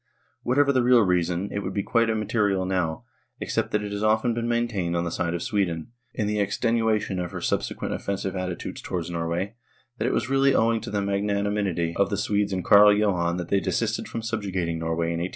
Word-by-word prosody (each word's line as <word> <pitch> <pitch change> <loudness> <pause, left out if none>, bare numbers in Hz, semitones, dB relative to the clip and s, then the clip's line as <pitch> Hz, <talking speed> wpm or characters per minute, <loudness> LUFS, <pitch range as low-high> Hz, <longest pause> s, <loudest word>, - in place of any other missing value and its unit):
Whatever 140 +3 +3
the 130 - +3
real 120 -1 +5
reason, 90 0 +1
it 100 - -2
would 95 -1 -5
be 100 - 0
quite 115 +1 +2
imma 110 -1 -1
terial 100 -4 +1
now, 90 -4 -1 0.4
except - - -1
that 105 0 0
it 105 - -5
has 100 0 -3
often 110 +2 +2
been 115 0 -2
maintained 115 -8 -1
on 85 - 0
the 85 - -3
side 85 +1 -1
of 85 - -3
Sweden, 90 -4 -1 0.2
in 105 -3 -1
extenuation 105 0 0
of 90 -1 -3
her - - -4
subse - - -1
quent - - -4
offensive 95 -1 -3
attitude 90 -1 -4
towards 90 -1 -4
Norway, 85 +4 -2 0.5
that 110 - 0
it - - +1
was - - 0
really 135 +1 +3
owing 115 0 +2
to 115 - -6
the 100 -1 -1
magnanimity 100 -3 0
of 100 - +2
the 100 - -1
Swedes 105 0 0
and 95 -1 -2
Carl 105 0 +8
Johan 90 -5 +1
that 90 -1 -5
they 100 - +3
desisted - - -1
from 115 - -5
subjugating 95 -7 -2
Norway 80 +1 -1
in 85 - -2
I8I4. 90 +2 -2
100 Hz, 215 wpm, -25 LUFS, 90-110 Hz, 0.5 s, Carl